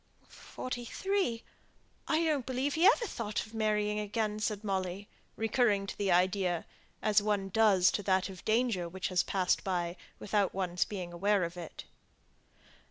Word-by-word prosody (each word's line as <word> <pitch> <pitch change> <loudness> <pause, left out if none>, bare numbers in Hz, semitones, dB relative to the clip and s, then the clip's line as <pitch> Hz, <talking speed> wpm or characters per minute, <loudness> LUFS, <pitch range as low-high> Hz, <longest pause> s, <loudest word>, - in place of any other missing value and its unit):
"Forty 250 -1 -6
three. 370 - -1 0.6
I 320 +1 +2
don't 300 -6 0
believe 265 +2 -1
he 335 +4 +5
ever 470 +2 +4
thought 225 - -3
of 220 - -16
marrying 210 -1 0
again," 210 0 -2
said 215 -1 -2
Molly, 190 0 -2 0.3
recurring 220 -3 +2
to - - -6
the 200 -2 0
idea, 180 -1 +2 0.4
as 210 -1 +4
one 205 -2 0
does 195 -3 +4
to - - -1
that 190 -1 +1
of 190 -2 -10
danger 220 -6 +1
which 190 +2 -4
has 180 -1 +3
passed 185 -2 0
by, 175 -2 -1 0.2
without 205 -2 0
one's 180 -2 0
being 180 -4 -6
aware 200 +2 +2
of 170 +1 -4
it. 175 -3 -8
205 Hz, 160 wpm, -31 LUFS, 185-225 Hz, 0.6 s, he